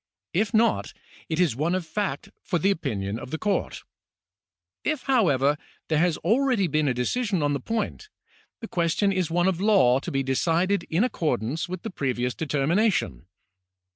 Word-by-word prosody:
If 200 +4 +1
not, 225 0 +2 0.4
it 160 0 -1
is 170 -10 +2
one 160 +7 0
of 185 -2 -2
fact 160 -3 -3
for 180 - -1
the 195 +5 +2
opinion 110 - -3
of 125 - -8
the 160 - -3
court. 200 +1 -2 1.0
If, 305 -3 -1
however, 150 - +2 0.3
there 155 -2 +2
has 170 -1 +2
already 235 - +2
been 155 -2 +1
a 130 - +2
decision 190 - 0
on 145 0 +1
the 140 - -1
point, 225 - -3 0.5
the 225 - -5
question 175 +3 +1
is 185 -4 0
one 175 +2 +2
of 185 -2 0
law 190 - +4
to - - -6
be 135 0 0
decided 170 +9 +1
in 170 +7 +2
accordance 155 - -1
with 185 -1 -5
the 225 - -5
previous 125 -6 -1
determination. 165 - 0
170 Hz, 170 wpm, -25 LUFS, 140-200 Hz, 1.0 s, law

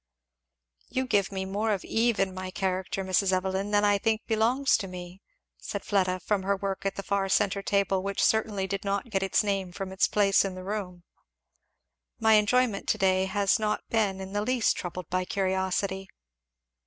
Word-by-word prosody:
"You 260 0 -1
give 205 -6 +1
me 190 -1 -3
more 205 +3 -1
of 200 -3 -2
Eve 230 -1 +1
in 190 -1 +1
my 185 0 -5
character, 190 0 -2
Mrs. 190 +1 +2
Evelyn, 190 +2 -1
than 205 0 +3
I 205 -1 +3
think 220 +1 0
belongs 235 +5 +2
to 200 -3 -5
me," 180 +1 -9 0.4
said - - -5
Fleda 185 -2 +1
from 205 +1 0
her 200 +1 +1
work 195 0 -3
at 195 - -3
the 200 - -5
far 195 0 0
centre 200 0 +2
table, 195 -1 +1
which 200 +1 -1
certainly 215 -3 +1
did 195 +1 -4
not 200 +3 -2
get 195 -2 0
its 195 +3 +2
name 195 -3 -1
from 190 +1 -6
its 190 - +2
place 200 -2 +3
in 195 -2 -4
the 185 - -8
room. 185 -3 -5 1.2
"My 220 0 +4
enjoyment 215 0 +2
to - - +2
day 190 0 +2
has 200 +2 +1
not 215 -1 -1
been 205 -4 +1
in 190 0 -7
the 205 - 0
least 245 +1 +1
troubled 180 -2 -6
by 185 0 +1
curiosity." 190 0 -1
195 Hz, 190 wpm, -27 LUFS, 190-210 Hz, 1.2 s, My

